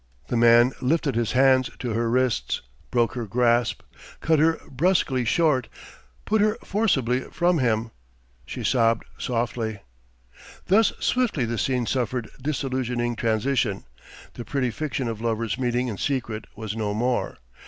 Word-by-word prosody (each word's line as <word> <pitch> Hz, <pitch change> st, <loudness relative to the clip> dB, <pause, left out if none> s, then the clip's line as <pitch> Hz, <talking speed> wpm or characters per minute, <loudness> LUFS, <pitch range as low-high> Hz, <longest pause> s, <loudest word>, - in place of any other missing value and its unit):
The -, -, -1 dB
man 120 Hz, +1 st, +6 dB
lifted 140 Hz, +1 st, +1 dB
his 115 Hz, -1 st, -1 dB
hands 130 Hz, -1 st, +4 dB
to 120 Hz, -, -4 dB
her 115 Hz, +1 st, 0 dB
wrists, 120 Hz, -, 0 dB, 0.3 s
broke 120 Hz, -2 st, +1 dB
her 120 Hz, -3 st, -4 dB
grasp, 120 Hz, +1 st, +1 dB, 0.4 s
cut 160 Hz, -1 st, +2 dB
her 160 Hz, +1 st, +3 dB
brusquely 140 Hz, -3 st, +1 dB
short, 140 Hz, -2 st, +2 dB, 0.6 s
put 215 Hz, 0 st, +2 dB
her 215 Hz, +1 st, +2 dB
forcibly 135 Hz, -, +1 dB
from 175 Hz, -1 st, +1 dB
him. 115 Hz, -2 st, 0 dB, 0.6 s
She -, -, -6 dB
sobbed 115 Hz, -3 st, +2 dB
softly.... 115 Hz, -3 st, -2 dB, 0.8 s
Thus 215 Hz, +4 st, +4 dB
swiftly 235 Hz, -, +1 dB
the 115 Hz, -1 st, -3 dB
scene 125 Hz, -2 st, 0 dB
suffered 125 Hz, -2 st, -2 dB
disillusioning 130 Hz, -4 st, -2 dB
transition. 115 Hz, -1 st, 0 dB, 0.5 s
The 120 Hz, -, -7 dB
pretty 125 Hz, -1 st, -1 dB
fiction 140 Hz, -1 st, -3 dB
of 110 Hz, -1 st, -4 dB
lovers 115 Hz, +1 st, -1 dB
meeting 125 Hz, 0 st, 0 dB
in 105 Hz, -5 st, -5 dB
secret 120 Hz, -6 st, -2 dB
was 110 Hz, -2 st, -5 dB
no 105 Hz, -2 st, -2 dB
more. 120 Hz, +3 st, -1 dB
125 Hz, 140 wpm, -24 LUFS, 115-135 Hz, 0.8 s, man